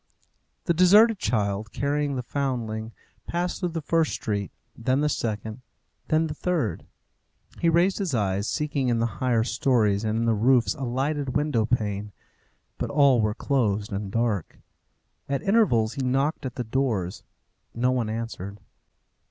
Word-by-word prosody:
The 170 - +2
deserted 205 +5 +6
child, 105 - -1
carrying 145 0 -1
the 125 - -3
foundling, 115 -5 -3 0.4
passed 175 +1 -2
through 180 - -1
the 165 -2 -4
first 165 0 +1
street, 100 -3 -2 0.3
then 130 +4 0
the 150 - +2
second, 110 -2 -3 0.5
then 155 +1 +2
the 155 - -4
third. 160 - -2 0.7
He 170 - +3
raised 175 +5 +3
his 180 -9 -1
eyes, 100 -1 0
seeking 145 -4 -1
in 120 - +2
the 115 - +1 0.2
higher 120 -3 +2
stories 110 -5 +1
and 110 0 0
in 115 - 0
the 115 - +3
roofs 120 +3 +3
a 135 - -5
lighted 135 +2 -2
window 145 -7 +1
pane; 105 -4 -1 0.7
but - - -2
all 140 -4 +4
were 105 0 0
closed 110 -7 0
and 100 0 -3
dark. 115 -6 -1 0.7
At 140 -1 -1
intervals 180 - +3
he 140 - -4
knocked 135 +2 0
at 125 - -8
the 125 - -2
doors. 110 -7 -1 0.5
No 125 +2 +2
one 120 -4 0
answered. 110 -3 -5
125 Hz, 155 wpm, -25 LUFS, 110-145 Hz, 0.7 s, deserted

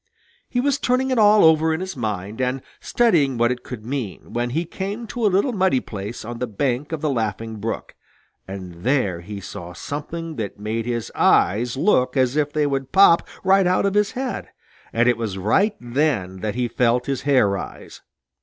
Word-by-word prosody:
He 245 - -1
was 280 +2 +1
turning 255 +1 +1
it 255 - +2
all 210 0 +6
over 160 0 +5
in - - -4
his 190 0 -5
mind 105 -1 -4
and 130 +1 -1 0.2
studying 160 - +2
what 120 +1 +3
it 125 - -3
could 110 -4 -8
mean, 125 -7 -5
when 120 +1 -1
he 165 +7 -1
came 200 +7 -5
to 235 +1 -5
a - - +4
little 200 +7 +1
muddy 190 - +2
place 105 0 -7
on 120 +1 -6
the 125 - -2
bank 130 +6 -2
of 160 -3 -3
the 155 - 0
Laughing 110 -2 -3
Brook, 110 +2 -4 0.5
and 90 -3 -8
there 115 -10 +1
he 100 +3 -7
saw 90 -2 -8
something 155 - -6
that 105 -2 -5
made 110 +2 -3
his 120 -2 -3
eyes 115 +6 +2
look 135 -6 +2
as 130 0 +2
if 150 -1 +1
they 150 -1 +1
would 135 -2 -2
pop 190 -3 +6 0.2
right 190 -1 +4
out 185 +2 +2
of 200 - +1
his 210 +2 +2
head, 260 0 -4 0.4
and 120 +1 +2
it 120 -2 +3
was 110 -5 -3
right 195 - +2
then 120 -7 -1
that 105 +3 -3
he 125 -1 0
felt 120 +1 +1
his 135 -2 -2
hair 135 -6 +4
rise. 100 -1 -6
130 Hz, 200 wpm, -22 LUFS, 110-175 Hz, 0.5 s, all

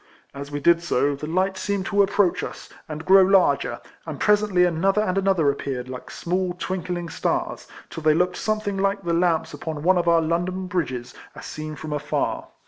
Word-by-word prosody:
As 140 0 -7
we 145 - -3
did 170 +3 +4
so, 145 -4 +1
the 150 +2 -7
light 185 +3 0
seemed 200 -1 -2
to 200 0 +2
approach 200 -2 +2
us, - - -7 0.2
and 155 +1 -6
grow 195 +1 +7
larger, 190 0 +3 0.2
and - - -7
presently 210 -4 +3
another 195 +5 +1
and 185 -3 -1
another 190 -7 +2
appeared, 130 -3 -5
like 125 -1 -8
small 180 +1 -2
twinkling 180 -2 -3
stars, - - -2 0.2
till 165 - -6
they 155 0 +4
looked 180 +2 +1
something 215 -2 -2
like 195 0 0
the 170 -1 -1
lamps 170 -1 +1
upon 155 -2 -5
one 180 +1 +4
of 170 - -2
our 170 -1 +5
London 175 +3 -1
bridges, 135 -10 -3 0.2
as - - -10
seen 155 0 -6
from 155 0 -6
afar. 145 0 -2
175 Hz, 190 wpm, -23 LUFS, 155-190 Hz, 0.2 s, grow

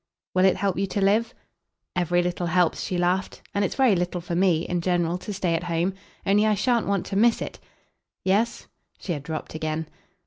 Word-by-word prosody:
"Will 185 0 +4
it 190 - +5
help 195 -2 -1
you 195 - 0
to 195 - -2
live?" 215 +4 +3 0.6
"Every 175 0 +2
little 175 0 -2
helps," 175 0 +2
she 185 - -2
laughed; 180 +2 0
"and 200 - +1
it's 195 - -1
very 260 -7 +4
little 180 0 -1
for 170 0 -5
me, 170 -2 +3
in 175 -1 -1
general, 175 0 0
to 195 - -6
stay 185 -4 0
at 165 +1 -1
home. 170 +2 0 0.3
Only 205 +2 +4
I 215 - +3
shan't 235 +2 +1
want 200 -2 0
to 195 - -5
miss 230 +3 +4
it - - -6 0.3
!" - - -56
"Yes?" 210 +5 +1 0.3
she 180 - -3
had 145 - -4
dropped 155 +2 -5
again. 155 0 -2
180 Hz, 210 wpm, -25 LUFS, 175-200 Hz, 0.6 s, it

